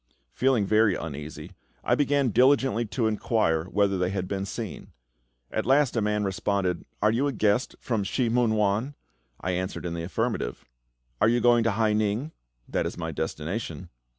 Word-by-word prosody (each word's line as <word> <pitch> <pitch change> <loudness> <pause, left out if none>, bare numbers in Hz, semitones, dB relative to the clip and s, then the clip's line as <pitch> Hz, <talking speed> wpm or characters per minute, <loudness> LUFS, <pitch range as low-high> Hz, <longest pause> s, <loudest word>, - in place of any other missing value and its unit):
Feeling 130 -5 +2
very 105 -1 +3
uneasy, 75 +2 -7 0.3
I - - +2
began 140 -2 +2
diligently 130 -1 +3
to 115 +2 -1
inquire 105 -7 +1
whether 100 0 +1
they 90 0 +1
had 95 -2 -3
been 100 0 -3
seen. 110 0 -6 0.6
At - - -2
last 135 -1 +3
a 115 - +1
man 105 0 0
responded, 95 -1 -1 0.2
"Are 105 - +5
you 130 +5 +1
a - - 0
guest 110 0 +1
from 115 -5 -1
Shih 120 +5 0
mun 115 -1 +2
wan?" 105 +7 0 0.5
I 95 - -1
answered 90 0 -3
in 85 - -3
the 85 - -4
affirmative. 105 - -2 0.6
"Are - - +5
you 120 +1 +3
going 120 -1 +4
to 115 - +3
Hai 110 0 +2
ning?" 110 +7 0 0.4
"That - - -1
is - - -7
my 80 -1 -3
destination." 80 +3 -4
105 Hz, 175 wpm, -26 LUFS, 95-120 Hz, 0.6 s, Are